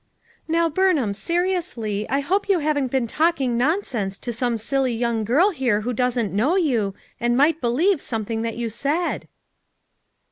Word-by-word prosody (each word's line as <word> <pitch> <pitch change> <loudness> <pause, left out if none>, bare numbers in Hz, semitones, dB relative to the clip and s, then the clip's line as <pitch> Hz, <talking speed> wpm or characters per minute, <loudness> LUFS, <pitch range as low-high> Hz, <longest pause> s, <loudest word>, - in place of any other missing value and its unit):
"Now, 335 +1 +2
Burnham, 315 - +1
seriously, 335 - -2
I 275 +1 +1
hope 390 +8 0
you 390 - +4
haven't 295 -3 0
been 260 -1 0
talking 275 -2 +1
nonsense 240 - -1
to 240 - -5
some 240 0 -1
silly 260 +3 0
young 230 -1 0
girl 295 - +3
here 245 - 0
who 245 +3 -2
doesn't 240 -3 0
know 250 - +2
you, 235 - +1 0.2
and 240 +1 +1
might 310 +4 +3
believe 300 +9 +2
something 225 -1 -3
that 230 0 -3
you 235 -1 -2
said." 285 - -2
255 Hz, 155 wpm, -23 LUFS, 230-330 Hz, 0.2 s, you